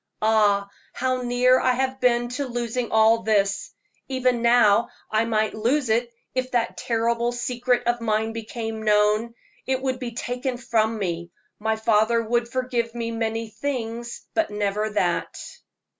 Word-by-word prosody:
Ah, 210 -2 +3 0.3
how 255 0 -1
near 250 +1 +3
I 255 - +3
have 265 +1 -1
been 240 -1 +2
to 270 +3 -3
losing 240 0 -3
all 220 +1 +5
this; 200 -3 +1 0.4
even 255 -2 +1
now 235 -2 +4 0.2
I 220 +1 +2
might 215 -2 0
lose 245 +4 0
it 235 +2 +1 0.2
if 255 0 -1
that 235 -1 0
terrible 235 +1 0
secret 245 0 -1
of 240 0 0
mine 220 0 0
became 225 0 -5
known 215 +2 +2 0.3
it 260 -1 +1
would 260 -1 -2
be 245 -2 -5
taken 245 +1 -3
from 225 -2 0
me. 170 -4 -3 0.3
My 220 +1 0
father 220 +1 +2
would 235 +1 0
forgive 240 -2 -2
me 230 -1 -3
many 225 0 -2
things, 235 -1 -4
but 330 - +1
never 210 +1 -1
that." 180 -5 -1
230 Hz, 150 wpm, -24 LUFS, 220-245 Hz, 0.4 s, all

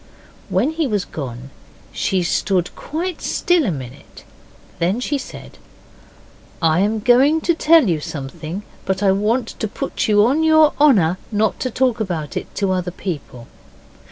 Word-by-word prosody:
When 300 - +1
he 320 -2 -1
was 205 -5 -1
gone 130 -2 -7 0.4
she 185 -2 0
stood 180 +1 0
quite 340 +3 -4
still 350 -3 +1
a - - +1
minute. 135 -1 -9 0.6
Then 185 +7 +1
she 280 +3 -1
said, - - -10 1.0
'I'm 190 +7 +2
going 265 +7 +4
to 340 - +2
tell 325 -4 +4
you 165 -4 +1
something, 155 +6 -6 0.2
but 190 +1 -1
I 195 - +5
want 220 +5 0
to 215 - -1
put - - -3
you 210 -1 +5
on 275 +7 +2
your 315 -1 +5
honour 185 - +4
not 215 0 0
to 255 - -2
talk 250 -1 0
about 170 -8 -3
it - - -3
to 195 -2 0
other 180 -1 -1
people. 150 -9 -6
205 Hz, 155 wpm, -20 LUFS, 170-265 Hz, 1.0 s, I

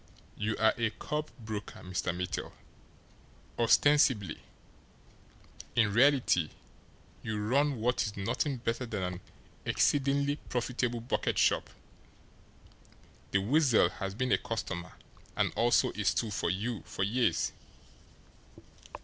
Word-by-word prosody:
You 110 +1 -2
are 110 0 +4
a 115 -1 +2
curb 150 +7 -4
broker, 110 -3 -6
Mr. 90 0 -2
Mittel 90 +1 -4 1.1
ostensibly. 120 - +4 1.4
In 105 -3 +3
reality, 120 - +4 0.7
you 110 -1 -3
run 135 +5 +1
what 120 +3 +1
is 105 -1 -3
nothing 125 +7 -1
better 120 +1 -2
than 105 -5 -3
an 90 0 -3 0.4
exceedingly 140 +1 +2
profitable 120 -1 -1
bucket 120 - -1
shop. - - +2 1.6
The 100 - +2
Weasel 130 +2 +4
has 95 -1 -5
been 125 +3 -1
a - - +4
customer 95 -7 -4 0.4
and - - +1
also 120 +1 +3
a 105 - -4
stool 105 +4 +1
for 85 -3 -1
you 105 +5 -2
for 95 - -4
years. 120 +5 +1
115 Hz, 115 wpm, -31 LUFS, 100-125 Hz, 1.6 s, are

